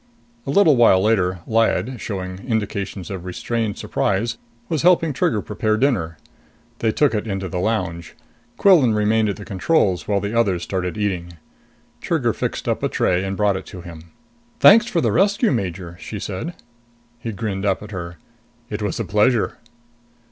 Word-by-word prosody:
A - - -3
little 180 -7 +5
while 115 -6 +5
later, 95 -4 +1
Lyad, 115 +2 +1
showing 95 -3 -5
indications 100 -5 -3
of 95 -3 -5
restrained 105 +3 -3
surprise, 100 - -1 0.3
was 160 -5 -1
helping 165 -3 +4
Trigger 110 -5 0
prepare 110 +1 -1
dinner. 105 - 0 0.6
They 115 - +1
took 145 +3 +2
it 105 +1 -2
into 95 -2 -3
the 90 +1 -3
lounge. 90 -5 -2 0.4
Quillan 150 - +5
remained 105 +1 +2
at 100 - -2
the 100 - -10
controls 100 - +1
while 100 -1 +1
the 100 +2 -4
others 100 -7 +1
started 90 0 -3
eating. 90 -4 -2 0.7
Trigger - - 0
fixed - - -4
up - - 0
a - - 0
tray 90 +1 +1
and 95 0 -3
brought 105 -2 +2
it 95 - -9
to 90 - -9
him. 85 -2 -11 0.5
"Thanks 230 +3 +7
for 180 -8 0
the - - +1
rescue, 200 +4 +2
Major!" 90 -7 -3
she 105 - -6
said. 105 - -5 0.6
He 115 -1 -4
grinned 100 -2 -4
up 100 0 0
at 105 - -10
her. 85 -3 -6 0.5
"It 105 0 -3
was 105 -3 -2
a - - -1
pleasure." 105 +3 +1
105 Hz, 170 wpm, -21 LUFS, 95-115 Hz, 0.7 s, Thanks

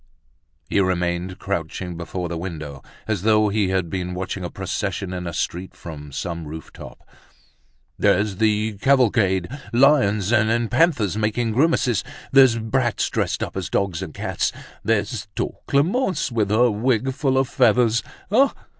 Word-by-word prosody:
He - - +1
remained 90 -1 0
crouching 90 -2 -4
before 90 +1 -4
the 85 - -4
window, 75 -5 -6 0.3
as 105 -5 -1
though 110 0 +3
he 105 -1 +1
had 95 -2 0
been 90 +1 -4
watching 95 +1 -4
a 90 - -3
procession 95 -1 -3
in 90 -1 -4
a - - -3
street, 90 +3 -4
from 75 -3 -9
some 85 +3 -4
rooftop. 80 +2 -10 0.9
"There's 100 -1 +2
the 105 -1 +1
cavalcade, 110 -9 +3 0.2
lions 115 -6 +3
and 115 +1 +2
panthers 120 - +2
making 110 +2 0
grimaces—there's 130 - +3
brats 120 +1 0
dressed - - -1
up - - -6
as - - -3
dogs 95 -3 -1
and 95 -4 -5
cats—there's 110 +4 -2
tall - - -3
Clemence, 170 - +1
with 110 -4 0
her 120 +3 +4
wig 125 +4 0
full 135 -1 0
of 135 0 +2
feathers. 120 -1 +3 0.3
Ah! 270 +6 +4
105 Hz, 140 wpm, -22 LUFS, 90-120 Hz, 0.9 s, her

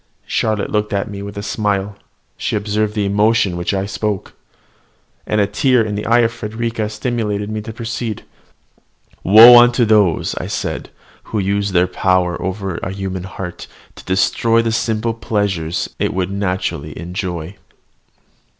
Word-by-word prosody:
Charlotte 110 -2 -1
looked 105 0 -1
at 100 +1 -2
me 100 -1 -6
with 100 0 -8
a 100 - -4
smile; 105 -2 -1 0.4
she - - -2
observed 105 +1 -1
the 105 -2 0
emotion 105 0 +2
with 85 - -5
which - - +1
I 95 0 -1
spoke: 100 0 -3 0.9
and 105 - +1
a 100 - +4
tear 120 +4 +2
in 105 -1 -3
the 105 +1 -4
eyes 120 +1 +4
of 115 - 0
Frederica 115 -1 -3
stimulated 110 -2 -2
me 110 0 -3
to 110 - -7
proceed. 115 -1 -4 1.0
"Woe 115 +5 +10
unto 120 0 +4
those," 105 -6 +2
I - - -5
said, - - -4 0.4
"who 110 - -4
use 100 0 0
their 90 -1 +3
power 90 -1 0
over 95 -1 -3
a 95 - -4
human 95 -2 -4
heart 90 -2 -7 0.3
to - - -13
destroy 95 +5 +2
the 115 - 0
simple 115 0 -1
pleasures 100 -7 -2
it - - -1
would 95 0 -1
naturally 90 -6 -3
enjoy! 90 0 -5
105 Hz, 160 wpm, -18 LUFS, 95-110 Hz, 1.0 s, Woe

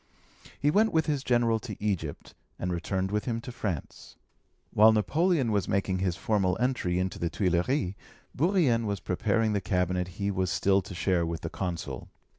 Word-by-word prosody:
He 145 - +3
went 220 +6 +3
with 160 -1 +2
his 145 -3 -1
General 120 -3 +2
to 110 -3 -7
Egypt, 95 -8 -3 0.2
and 90 0 -2
returned 95 +2 -2
with 105 0 -1
him 115 -2 -1
to 125 - -7
France. 100 - -5 0.6
While 110 +2 +7
Napoleon 145 - +2
was 100 -3 0
making 95 -1 0
his 90 -2 0
formal 95 -2 +1
entry 120 -8 0
into 95 +1 -2
the 85 - -1
Tuilleries, 90 - 0 0.4
Bourrienne 145 - +2
was 100 -1 -2
preparing 110 +4 0
the 100 - 0
cabinet 90 -1 0
he 100 0 0
was 95 -2 -1
still 95 +1 +2
to 95 0 -9
share 90 -1 +1
with 85 0 -3
the - - -5
Consul. 80 -8 -4
100 Hz, 175 wpm, -28 LUFS, 90-120 Hz, 0.6 s, While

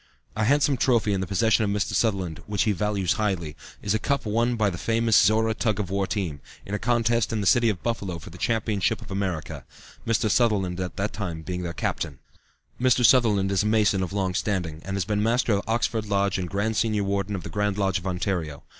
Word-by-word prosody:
A 110 0 0
handsome 140 +2 +3
trophy 115 -5 +2
in 95 - -1
the 95 - -3
possession 110 +3 +2
of 105 - 0
Mr. 100 0 -1
Sutherland, 95 -8 0
which 105 -1 0
he 110 - +2
values 100 -1 0
highly, 85 -7 -1 0.3
is 100 - 0
a 110 - +1
cup 140 +5 -1
won 115 +3 +1
by 105 -3 +1
the 85 - -6
famous 115 -1 +1
Zorra 110 +1 +4
tug 110 -2 -1
of 95 -3 -3
war 100 -1 0
team, 85 -11 -3 0.2
in 100 - -7
a 105 - -1
contest 115 -1 +1
in 110 - -1
the 100 - -2
city 120 +2 +4
of 95 -5 -3
Buffalo 100 -7 -2
for 85 - -11
the 90 - -12
championship 110 -3 0
of - - -12
America, 85 -7 -3 0.4
Mr. 115 0 +2
Sutherland 100 -5 +1
at 90 -1 -4
that 100 +2 -2
time 85 -6 -5
being 90 +1 -4
their 85 -1 -3
captain. 70 -4 -3 0.6
Mr. 125 -1 +4
Sutherland 105 -6 +4
is 100 - +2
a 105 - 0
Mason 105 -3 +2
of 90 - -3
long 95 -2 -1
standing, 90 -5 -2
and 95 +1 -3
has 95 -3 -1
been 105 +1 0
Master 115 +1 +2
of 100 - 0
Oxford 110 -1 0
Lodge 100 -1 +1
and 90 -1 -3
Grand 105 +3 -1
Senior 105 -2 +1
Warden 100 0 -1
of 90 - -5
the - - -6
Grand 105 -1 -1
Lodge 95 -3 +1
of 90 - -7
Ontario. 90 -5 -2
100 Hz, 225 wpm, -25 LUFS, 95-110 Hz, 0.6 s, Zorra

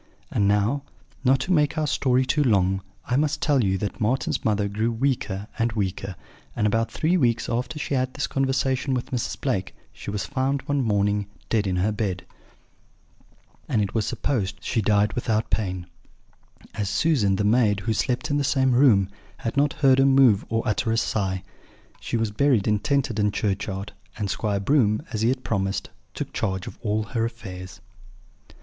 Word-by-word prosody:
And 100 - +2
now, 105 +7 +2 0.4
not 135 0 +4
to 185 +7 0
make 150 -3 +2
our 155 - +1
story 130 -3 +2
too 145 +3 +2
long, 95 -5 +2 0.2
I 125 - 0
must 150 +1 +1
tell 145 -4 +2
you 95 -1 +1
that 105 +4 -4
Marten's 120 +5 0
mother 105 -2 +1
grew 110 +3 -1
weaker 115 -5 -1
and 115 0 +1
weaker, 95 -2 -3 0.4
and 110 - 0
about 115 +2 +1
three 170 +4 +1
weeks 120 -6 +1
after 125 +3 -2
she 150 - -3
had 135 - +3
had 130 - -25
this - - -1
conversation 135 0 0
with 125 - -4
Mrs. 125 -3 -2
Blake 100 -9 -2 0.2
she - - -8
was 100 0 -2
found 135 -1 -1
one 145 0 0
morning 105 -3 +1 0.2
dead 105 -3 +1
in 95 - 0
her 95 +4 +1
bed; 100 -4 -3 1.4
and - - +2
it 100 -2 -1
was 110 -3 0
supposed 105 -9 -1
she 115 - 0
died 105 0 +2
without 110 -2 -1
pain, 95 -4 -1 0.9
as 100 -2 -2
Susan, 105 -3 +2
the 105 - 0
maid, 105 -2 +3
who 110 +3 0
slept 125 +5 -1
in 145 - +2
the 145 - +1
same 135 -2 +2
room, 120 -7 +5 0.3
had 115 - -4
not 140 +1 +2
heard 135 -2 +4
her 135 - +5
move 135 -7 +5
or 115 0 0
utter 110 +2 0
a 115 - +1
sigh. 95 -5 -1 0.6
She 120 - -2
was 110 -2 -1
buried 125 -2 +2
in 105 -1 +2
Tenterden 110 -5 +1
churchyard, 100 0 -2 0.2
and 100 -3 -2
Squire 105 -3 -1
Broom, 110 0 +2
as 110 -3 -2
he 115 - +3
had 130 0 -1
promised, 95 -2 -2 0.2
took - - -5
charge 95 -1 -2
of - - -9
all 110 -1 0
her 115 +1 -2
affairs. 95 -6 -7
115 Hz, 185 wpm, -24 LUFS, 100-130 Hz, 1.4 s, room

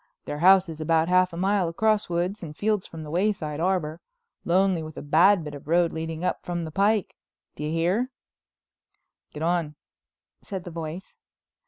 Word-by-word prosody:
Their 145 - -4
house 190 +2 +6
is 160 -1 -7
about 160 +1 +2
half 185 0 +4
a 170 - -7
mile 190 -1 +1
across 215 +4 +1
woods 175 +4 -1
and 155 -3 -8
fields 210 -2 0
from 160 -1 -9
the 150 - -8
Wayside 175 -5 -1
Arbor, 170 -3 -1 0.4
lonely 185 0 +2
with 155 0 -9
a - - -5
bad 170 +5 +4
bit 150 -1 -7
of 145 0 -10
road 170 +1 +2
leading 160 +1 -4
up 180 - -1
from 175 -1 -3
the 160 - -7
pike. 200 +3 +1 0.4
Do - - -6
you 150 - -2
hear?" 180 +10 +1 1.2
"Get 150 - -6
on," 165 -3 0 0.7
said 190 -3 -6
the 175 - -8
voice. 165 +3 -7
170 Hz, 180 wpm, -25 LUFS, 160-190 Hz, 1.2 s, house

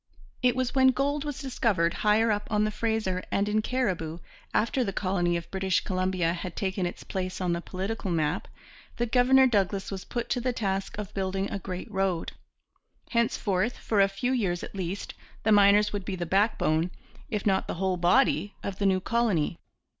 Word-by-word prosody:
It 250 -1 +3
was 255 -1 -1
when 265 -1 +5
gold 280 +3 +1
was 290 -2 -4
discovered 225 - +1
higher 215 +2 +4
up 205 0 -1
on 210 0 +2
the 215 - 0
Fraser 215 -4 -1
and 200 +1 +1
in 215 +1 +2
Cariboo, 185 -11 -1 0.3
after 235 +4 +1
the 200 - -2
colony 180 -3 0
of 170 0 -8
British 190 -1 +1
Columbia 185 -3 0
had 175 0 -6
taken 190 -2 -1
its 175 - -8
place 185 -1 -4
on 180 -2 0
the 170 - -2
political 195 +3 -4
map, 155 -3 0 0.5
that 240 -2 -1
Governor 260 +1 +6
Douglas 200 -5 +1
was 190 -2 -5
put 240 -1 -4
to 245 - 0
the 250 +1 0
task 195 -4 -2
of 210 -2 -6
building 195 0 -2
a 200 - -2
great 185 +3 -6
road. 190 -4 -1 0.8
Henceforth, 225 -2 +1
for 210 -3 +1
a 195 - +6
few 195 +6 -2
years 195 -9 0
at - - -7
least, 190 0 -4 0.3
the 220 - +2
miners 205 0 +5
would 200 -2 -2
be 195 0 -3
the 175 -1 -3
backbone, 180 -4 +2 0.4
if 210 -5 -2
not 195 -2 +2
the - - -3
whole 190 +1 0
body, 205 +3 +3
of 195 -1 -5
the 200 - +2
new 185 -1 +2
colony. 200 -8 0
195 Hz, 190 wpm, -27 LUFS, 185-225 Hz, 0.8 s, Governor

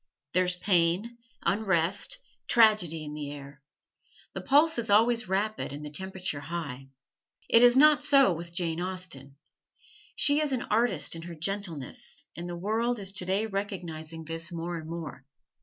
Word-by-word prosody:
There's 180 0 +3
pain, 185 +5 +1 0.2
unrest, 195 - +1 0.3
tragedy 210 -9 +4
in 150 - -7
the 150 -1 -5
air. 140 -1 -10 0.7
The - - -5
pulse 285 -5 +3
always 230 +3 +5
is 205 - -12
rapid 210 +3 -1
and 145 +1 -7
the 150 - -7
temperature 190 -3 -4
high. 140 -4 -6 0.6
It 230 - +6
is 245 +1 +7
not 300 +1 +6
so 275 -9 +5
with 170 +1 -7
Jane 170 -1 -2
Austen. 180 -7 -6 0.8
She 290 +1 +3
is 295 -3 -1
an 250 - -1
artist 230 -4 +1
in 165 - -7
her 170 0 -8
gentleness, 195 - -4
and 175 +1 -6
the 175 - -4
world 225 +6 0
is 195 -2 -4
today 190 +2 -1
recognizing 175 -6 -5
this 165 +2 -5
more 170 +1 -4
and 160 -1 -7
more. 160 -5 -7
180 Hz, 155 wpm, -28 LUFS, 165-220 Hz, 0.8 s, is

